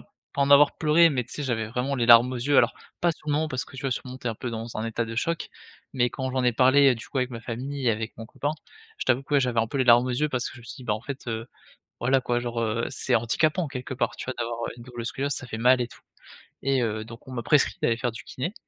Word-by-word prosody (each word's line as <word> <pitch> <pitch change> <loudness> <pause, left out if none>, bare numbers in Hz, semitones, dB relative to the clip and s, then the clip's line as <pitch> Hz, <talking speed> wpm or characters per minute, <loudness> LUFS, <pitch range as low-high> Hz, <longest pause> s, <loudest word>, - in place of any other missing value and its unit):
heu, - - -14 0.3
en 140 0 +2
avoir 145 0 +7
pleuré, 165 +1 +5
mais 130 -4 0
tu 120 - -13
sais 150 - -4
j'avais 115 -4 -1
vraiment 125 +4 -2
les 120 -3 0
larmes 120 +1 +8
aux - - -3
yeux. 135 +4 +1
Alors - - +4 0.3
pas 175 - +3
sur 155 - -19
le - - +2
moment, 155 +2 +1
parce 130 -3 -3
que - - -14
tu 130 - -7
vois, 135 - -1
sur - - -4
le - - -9
moment 130 - -8
tu 125 - -9
es - - +2
un 110 - -5
peu 120 - -5
dans 115 - -4
un - - -9
peu - - -9
dans - - -3
un - - -2
état 115 +1 -1
de 115 0 -6
choc, 165 +7 -1 0.5
mais 120 -2 +2
quand 130 +1 -3
j'en 130 0 0
ai 125 - +3
parlé, 130 +3 +5
heu, - - -1
du 115 - -10
coup 135 - -3
avec 125 0 0
ma 115 -2 -6
famille, 130 +3 -3
avec 110 +1 -3
mon 115 - -8
copain, 145 +5 -3 0.5
je - - -3
t'avoue 130 +1 +2
que 145 +2 -3
ouais, 140 - +5
j'avais 125 -3 +1
un 115 - 0
peu 140 - -3
les 130 - +3
larmes 120 +1 +6
aux - - -1
yeux. 150 +5 0
Parce 125 -4 -2
que - - -13
je - - -12
me - - -15
suis - - -8
dit, 130 - -10
bah 115 - 0
en 105 - -5
fait, 140 +2 -7
heu, 115 +1 -3 0.5
voilà 130 +2 +2
quoi, 120 -1 0
genre, 120 -1 -3
heu, 115 +1 0
c'est - - 0
handicapant 155 +9 +1
quelque 130 -1 -6
part, - - -1
tu - - -7
vois? 130 - -3
D'avoir, 115 0 -3
heu, - - -4
une 120 - -10
double 120 -1 -7
scoliose, 140 +5 -2
ça 130 - -4
fait 110 - -5
mal 125 +2 +4
et 120 - -1
tout, - - -17 0.6
et 135 -2 +1
heu, 110 -1 -2
donc 115 +1 -12
on 130 - -9
m'a 120 - -3
prescrit 150 -2 +3
d'aller 115 - +2
faire 120 0 -1
du 115 - -9
kiné, 165 +10 -4
125 Hz, 330 wpm, -26 LUFS, 115-135 Hz, 0.6 s, larmes